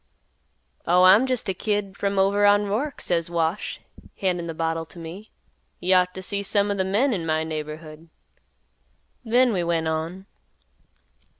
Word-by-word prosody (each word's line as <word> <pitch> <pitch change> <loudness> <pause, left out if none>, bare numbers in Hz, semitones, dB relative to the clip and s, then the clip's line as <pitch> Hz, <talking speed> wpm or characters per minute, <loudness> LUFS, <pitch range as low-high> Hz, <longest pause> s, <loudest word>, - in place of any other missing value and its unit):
"'Oh, 180 +1 +5
I'm 200 +8 +7
jest 255 -2 -1
a 190 - 0
kid 205 0 -2
from 200 0 -2
over 200 +2 +3
on 205 0 +5
Roark,' 240 +9 -2
says 170 -1 0
Wash, 170 +3 -2 0.4
handin' 175 -3 -1
th' 160 - -11
bottle 165 0 -1
t' 165 +2 -13
me. 175 +6 -9 0.5
'You 185 +2 +2
ought 180 0 +3
t' 190 - -6
see 200 +2 -1
some 200 0 +1
o' - - -1
th' 190 -1 -1
men 235 +8 +2
in 180 -5 -2
my 160 -1 0
neighborhood!' 155 +1 -7 1.1
Then 245 +1 +3
we 180 -3 0
went 165 -1 0
on." 165 +4 -3
185 Hz, 165 wpm, -24 LUFS, 165-205 Hz, 1.1 s, I'm